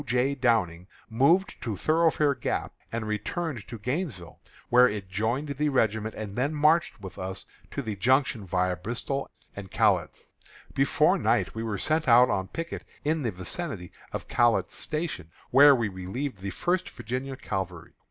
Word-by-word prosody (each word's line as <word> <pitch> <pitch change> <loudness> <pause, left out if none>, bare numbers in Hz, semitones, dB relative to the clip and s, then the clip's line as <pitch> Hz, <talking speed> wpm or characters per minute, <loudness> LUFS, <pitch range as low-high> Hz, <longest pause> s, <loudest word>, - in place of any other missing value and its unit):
J. 125 +4 +2
Downing, 110 -10 +1 0.2
moved 165 - +3
to 110 -5 -3
Thoroughfare 155 - +3
Gap - - -3 0.2
and 115 -1 -3
returned 110 +5 -3
to 120 - -7
Gainesville, 125 - -4 0.3
where 125 +1 +6
it 100 -2 -5
joined 115 +9 -1
the 150 +2 0
regiment, 110 -4 0
and 105 -2 -6
then 140 +5 0
marched 150 -5 +3
with 95 -2 -9
us 95 +1 -5 0.2
to 140 - -4
the 110 -3 -3
Junction 120 -1 +1
viâ 90 0 0
Bristoe 120 +6 -3 0.3
and 100 -2 -8
Catlett's. - - +1 0.5
Before - - +3
night - - +1
we 110 - -4
were 110 -3 -2
sent 155 +8 +1
out 125 +1 +7
on 95 0 -1
picket 165 - -5 0.2
in 155 +1 +1
the 120 - 0
vicinity 95 - -4 0.2
of - - -5
Catlett's 115 -6 +2
Station, 150 - -3 0.2
where 140 +2 +8
we 115 -3 0
relieved 100 +6 -5
the 100 +1 -4
First 175 - -1
Virginia 130 +4 -5
Cavalry. 95 - -5
120 Hz, 160 wpm, -27 LUFS, 100-140 Hz, 0.5 s, where